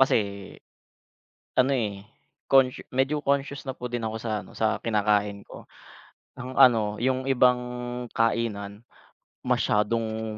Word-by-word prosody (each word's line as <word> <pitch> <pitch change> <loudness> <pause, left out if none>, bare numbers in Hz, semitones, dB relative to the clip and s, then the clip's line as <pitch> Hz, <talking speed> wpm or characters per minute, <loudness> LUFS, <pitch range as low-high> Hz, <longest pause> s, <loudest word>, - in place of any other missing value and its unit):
kasi 135 - +5 1.4
ano, 130 +1 +4
eh, 105 -5 -2 0.5
consciou 135 -2 +3
medyo 135 +3 +1
conscious 140 0 -1
na 130 - -4
po 125 - -5
din 120 -1 -3
ako 110 - -4
sa 115 - -4
ano, 95 - -14
sa 110 0 0
kinakain 105 -2 0
ko. - - -13 0.7
Ang 125 +1 -6
ano, 115 -6 +5
yung 130 +1 0
ibang 125 -1 +4 0.5
kainan 105 -3 -1 0.7
masyadong 110 0 0
115 Hz, 120 wpm, -26 LUFS, 105-130 Hz, 1.4 s, kasi